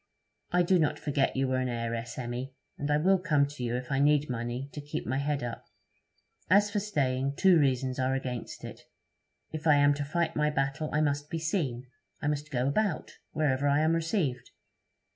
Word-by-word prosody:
'I 180 0 +4
do 180 +1 +3
not 150 -1 +1
forget 140 -2 0
you 135 0 +1
were 130 0 0
an 130 -1 -1
heiress, 115 0 -3
Emmy, 125 +2 -5 0.2
and 145 - -4
I 150 - +3
will 190 +5 +3
come 150 -6 +2
to 140 -3 -7
you 120 0 -1
if 125 +1 -5
I 135 - +1
need 145 -1 +3
money 120 +2 -3
to 145 - -6
keep 145 +1 -5
my 130 +3 -1
head 140 -1 -1
up. 120 -1 -5 0.8
As 205 +3 +5
for 205 - 0
staying, 140 -9 -1
two 185 -1 +5
reasons 130 -2 +1
are 130 +1 +1
against 125 -3 -5
it. - - -8 0.7
If 160 +1 -4
I 150 - +7
am 145 0 +5
to 145 0 -3
fight 165 +3 -1
my 150 0 +2
battle, 140 +1 -1
I 150 - +1
must 145 0 0
be 165 - -2
seen; 155 -7 -2 0.3
I - - -6
must 145 0 -1
go 125 0 0
about 185 +3 -1
wherever 145 -2 +1
I 140 +1 +3
am 160 +1 +3
received. 160 - -1
145 Hz, 200 wpm, -29 LUFS, 130-155 Hz, 0.8 s, I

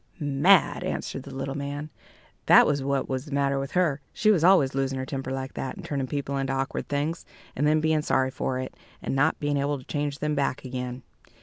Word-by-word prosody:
"Mad," 150 +6 +4
answered 135 - -3
the 135 0 -10
little 135 0 -3
man 145 +2 -5 0.6
"that - - +8
was 145 -1 +1
what 135 0 -1
was 130 +1 -3
the 150 - -11
matter 140 0 +1
with 135 0 -5
her. 155 -6 +1
She 215 - +3
was 175 -6 +2
always 175 -7 +5
losing 135 0 -1
her 130 - -3
temper 135 -1 -4
like 135 0 -4
that, 135 - -4
and - - -10
turning 140 -3 -2
people 140 0 -3
into 135 0 -1
awkward 135 +1 -2
things, 145 +4 -1 0.3
and 145 +3 +1
then 155 +1 +4
being 155 0 +2
sorry 130 -3 +1
for 130 0 -2
it, 130 - -5 0.3
and - - -2
not 145 +4 +2
being 145 -1 0
able 140 +1 0
to 130 - -13
change 145 -1 -2
them 150 +1 -1
back 140 -2 -1
again. 125 0 -5
140 Hz, 220 wpm, -26 LUFS, 135-150 Hz, 0.6 s, that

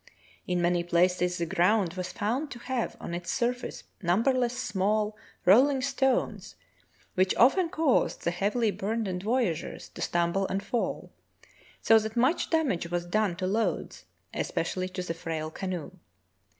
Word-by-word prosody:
In 180 -1 0
many 175 0 +2
places 180 +1 +2
the 170 - -1
ground 180 +2 +2
was 185 0 -4
found 240 +8 -2
to 255 - -8
have 245 0 -3
on - - -6
its 175 0 -5
surface 245 0 -2 0.2
numberless 240 +7 +2
small, 210 -1 0 0.3
rolling 265 +9 +6
stones, 265 -1 0 0.6
which 185 0 +2
often 330 +8 +4
caused 315 -5 +1
the 170 - +1
heavily 210 +5 +1
burdened 200 -3 -2
voyageurs 215 -6 -1
to - - -10
stumble 175 +3 +1
and 195 +1 -2
fall, 240 - -2 0.7
so 225 0 +7
that 220 +2 -5
much 260 +8 +2
damage 270 - 0
was 175 0 -2
done 200 0 +1
to 185 +1 -3
loads, 195 -2 -1 0.3
especially 185 +2 -2
to 185 0 -4
the 165 - -3
frail 160 -1 -4
canoe. 180 -2 -4
195 Hz, 145 wpm, -28 LUFS, 175-240 Hz, 0.7 s, so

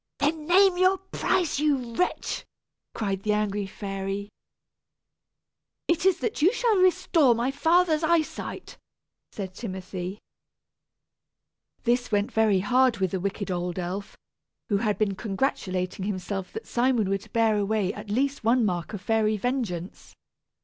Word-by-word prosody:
"Then 305 +1 -1
name 370 0 +5
your 370 +1 +4
price, 365 -4 -1
you 275 -6 0
wretch!" 360 +9 -1 0.5
cried 195 -3 -2
the 210 +1 +1
angry 205 -1 -1
fairy. 195 0 -4 1.6
"It 340 +2 +2
is 375 -2 +4
that 435 - -2
you 350 +6 +6
shall 465 -3 +2
restore 330 -7 +4
my 240 +3 0
father's 325 +2 +3
eye 330 0 +4
sight," - - -8 0.5
said 190 -3 -6
Timothy. 185 -2 -6 1.7
This 245 0 +1
went 205 0 +1
very 215 -4 +3
hard 250 +3 +3
with 190 -3 0
the 190 - -1
wicked 200 +1 -3
old 175 0 -2
elf, 185 +3 -5 0.5
who 205 - +2
had 210 -1 0
been 210 -2 +1
congratulating 190 -3 -2
himself 195 -1 -4
that 445 - -6
Simon 240 -4 +1
would 195 0 -3
bear 225 -2 +3
away 205 -1 0
at 210 0 -9
least 270 +5 0
one 235 +1 +3
mark 180 0 -2
of 205 - -5
fairy 215 +1 +1
vengeance. 205 -7 -4
220 Hz, 140 wpm, -26 LUFS, 195-280 Hz, 1.7 s, you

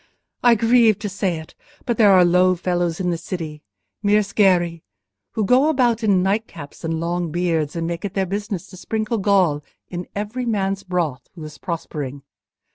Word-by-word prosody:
I 240 -1 +6
grieve 230 -1 +4
to 210 - -4
say 190 -3 -1
it, 160 0 -10 0.3
but 235 -3 -1
there 210 -3 +7
are 185 -2 +6
low 180 +1 +4
fellows 175 -2 -1
in 180 -1 0
this 165 -1 -4
city—mere 160 - -2
sgherri, 180 -5 +2 0.5
who 215 - 0
go 260 +8 +4
about 245 -6 +2
in 195 -4 +3
nightcaps 195 -8 -3
and 165 0 -2
long 170 0 -2
beards, 165 -3 0
and 165 -1 -2
make 170 +1 -4
it 195 -2 -5
their 195 -1 +1
business 200 0 -4
to 185 - -12
sprinkle 220 +3 -2
gall 185 -7 +2 0.3
in 175 0 -5
every 215 +5 -3
man's 195 -3 0
broth 170 -9 -2
who 165 - -9
is 155 -1 -10
prospering. 145 -6 -5
185 Hz, 175 wpm, -21 LUFS, 165-210 Hz, 0.5 s, there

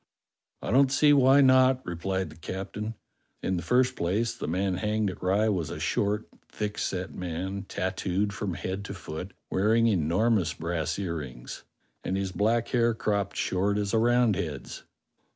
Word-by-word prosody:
"I - - -2
don't 135 +2 +5
see 145 +2 +5
why 135 0 +6
not," 130 -1 +5
replied 95 +2 -2
the - - -13
captain. 100 +6 -5 0.5
"In 95 - 0
the 85 - -2
first 125 +8 +2
place, 105 +7 0
the - - -5
man 90 +3 0
hanged 105 0 0
at - - -12
Rye 100 +4 +2
was 90 -7 0
a - - -6
short, 105 +2 0 0.2
thick 105 -1 -3
set 95 0 -3
man, 90 +3 -4
tattooed 95 +2 -1
from 95 -1 -3
head 95 +4 -4
to 100 - -6
foot, 90 +1 -7 0.2
wearing 110 +4 +3
enormous 95 -1 +2
brass 80 -1 -2
earrings, 75 -10 -5 0.4
and 95 - -1
his 95 -1 -2
black 110 +4 +1
hair 120 -2 +2
cropped 100 -3 -1
short 100 +2 0
as 105 0 -1
a 110 - +4
Roundhead's." 110 - +1
100 Hz, 160 wpm, -28 LUFS, 90-115 Hz, 0.5 s, why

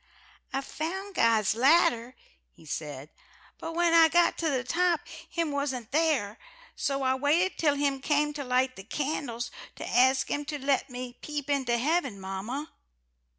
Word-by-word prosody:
"I 270 - -1
found 375 +8 -5
God's 225 - +3
ladder," 250 -2 +3 0.3
he - - -20
said, 150 -1 -6 0.5
"but 330 - -5
when 345 -1 +3
I 330 -1 +8
got 345 +1 +3
to 330 - +1
the 260 -3 0
top, 340 +4 +1 0.3
Him 335 -3 -1
wasn't 265 -5 -3
there. 290 -9 +1 0.4
So 275 -1 -1
I 260 0 +3
waited 300 +8 +2
till 295 -3 +3
Him 280 -1 0
came 295 +1 +1
to 290 -1 -4
light 255 0 +1
the 195 - -8
candles 240 -1 -3 0.2
to - - -7
ask 260 +2 +3
Him 290 - -1
to 295 0 -4
let 275 0 0
me 250 0 -7
peep 295 -1 -4
into 260 -4 +1
heaven, 275 - 0
mamma. 195 +11 -5
275 Hz, 160 wpm, -28 LUFS, 245-305 Hz, 0.5 s, I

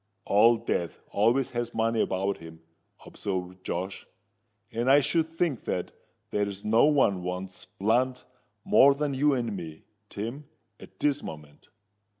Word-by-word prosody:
"Old 115 +3 +4
Death 85 -7 -1
always 120 +6 +2
has 120 -1 -3
money 115 0 +1
about 95 -1 -1
him," 80 0 -12 0.4
observed 95 -1 -5
Josh; 95 +2 -4 0.6
"and 120 +2 -1
I 140 +2 +7
should 160 +3 +1
think 165 -6 -2
that 90 - -2 0.4
there's 100 -1 -2
no 110 +4 +5
one 135 -11 +3
wants 90 +1 -5
blunt 125 +5 +1 0.4
more 140 +1 +6
than 145 0 -1
you 140 +1 +3
and 115 -4 -2
me, 80 -4 -8 0.3
Tim, 120 +8 -6 0.3
at - - -15
this 145 0 +2
moment." 75 -2 -10
110 Hz, 140 wpm, -27 LUFS, 95-135 Hz, 0.6 s, I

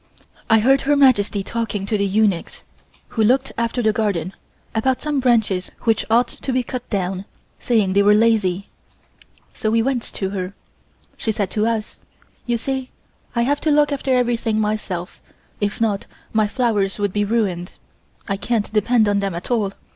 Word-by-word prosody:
I 225 - +6
heard 270 +5 +4
Her 290 +1 +2
Majesty 215 -8 +3
talking 215 -2 -3
to 215 - -1
the 200 -1 +1
eunuchs 200 -3 0 0.5
who 225 - 0
looked 255 +5 +2
after 235 +1 -1
the 215 -1 +3
garden, 195 -5 -1 0.4
about 255 +3 +1
some 300 -2 -1
branches 220 -7 +2
which 225 -2 +1
ought 235 +2 +4
to 270 - -5
be 255 0 +1
cut 250 0 -6
down, 190 -1 -2 0.3
saying 215 -6 +1
they 200 - +4
were 205 +1 +5
lazy. 210 -4 +2 0.9
So 215 - -2
we 225 +1 +2
went 260 -1 0
to 190 -1 -3
her. 190 0 -4 0.6
She 220 - -1
said 200 -3 -2
to 215 +1 +1
us: 225 -2 -2 0.5
"You 240 -1 +1
see 265 +2 -3 0.5
I 235 - +2
have 285 +4 0
to 315 - +1
look 295 0 +4
after 275 -1 -1
everything 235 -3 +1
myself, 210 -5 -3 0.4
if 205 0 -2
not, 210 -3 0 0.3
my 215 -1 +3
flowers 210 -5 0
would 205 -2 -1
be 205 - +1
ruined. 200 -5 -1 0.5
I 200 -2 -1
can't 215 0 -1
depend 220 +1 +3
on 205 0 +2
them 195 -3 -2
at 175 +8 -6
all. 215 -5 +1
220 Hz, 175 wpm, -21 LUFS, 200-240 Hz, 0.9 s, I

